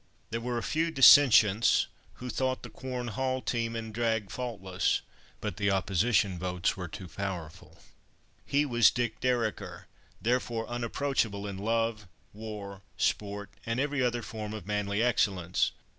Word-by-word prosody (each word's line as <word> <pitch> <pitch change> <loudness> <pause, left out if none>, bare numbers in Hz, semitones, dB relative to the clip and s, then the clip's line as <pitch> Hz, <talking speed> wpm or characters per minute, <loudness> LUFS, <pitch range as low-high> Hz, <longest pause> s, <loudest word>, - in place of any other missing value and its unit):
There 115 +1 -2
were 120 0 -2
a 115 - -2
few 160 +2 0
dissentients, 115 -7 +7 0.3
who 125 0 -6
thought 130 +3 -1
the 120 - -9
Quorn 125 +1 -5
Hall 130 +4 -1
team 115 -2 -2
and 110 -1 -5
drag 110 -3 -1
faultless. 95 -7 -1 0.4
But 105 -5 -4
the 100 0 +1
opposition 95 0 +1
votes 90 0 -1
were 90 -2 -5
too 90 +3 -8
powerful. 90 -4 -6 0.6
He 145 +1 +1
was 120 -5 +5
"Dick 120 -2 -2
Dereker," 120 -4 -1 0.3
therefore 120 -1 0
unapproachable 120 -3 -1
in 100 -2 -5
love, 115 -1 -1 0.3
war, 105 -2 -7 0.2
sport, 100 0 -1
and 115 +2 -2
every 145 0 0
other 120 -1 0
form 110 -1 -6
of 105 - -8
manly 105 +1 0
excellence. 95 -7 +1
110 Hz, 145 wpm, -29 LUFS, 100-120 Hz, 0.6 s, dissentients